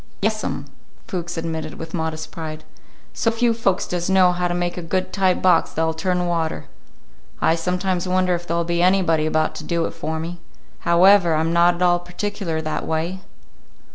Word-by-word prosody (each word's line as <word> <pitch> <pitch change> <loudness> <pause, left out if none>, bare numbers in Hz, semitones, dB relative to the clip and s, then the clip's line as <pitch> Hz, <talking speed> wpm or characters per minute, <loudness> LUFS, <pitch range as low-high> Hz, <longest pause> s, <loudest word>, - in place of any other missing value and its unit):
"Yes, 215 +1 0
'm," 140 - -3 0.4
Fuchs 175 -1 -4
admitted 160 -1 -4
with 165 0 -8
modest 160 -2 -3
pride. 155 -2 -6 0.5
"So 230 - +1
few 230 +1 +2
folks 200 -5 0
does 175 0 -3
know 190 -1 +5
how 180 0 -1
to 175 - -2
make 175 0 -1
a 180 - -5
good 185 +2 -2
tight 190 -2 +1
box 180 -3 +4
that'll 160 0 0
turn 180 +2 -1
water. 165 -2 -1 0.7
I - - +3
sometimes 180 +2 -1
wonder 185 0 +2
if 175 0 -4
there'll 170 +1 0
be 170 0 0
anybody 175 -4 +3
about 155 0 +1
to - - -7
do 170 -1 0
it - - -3
for 160 +1 -4
me. 170 +2 -6 0.5
However, 175 -1 +6
I'm 160 +2 0
not 170 +1 +4
at 175 - -8
all 175 -1 +4
particular 175 -1 -3
that 155 - -3
way." 165 +4 -2
175 Hz, 185 wpm, -22 LUFS, 165-185 Hz, 0.7 s, However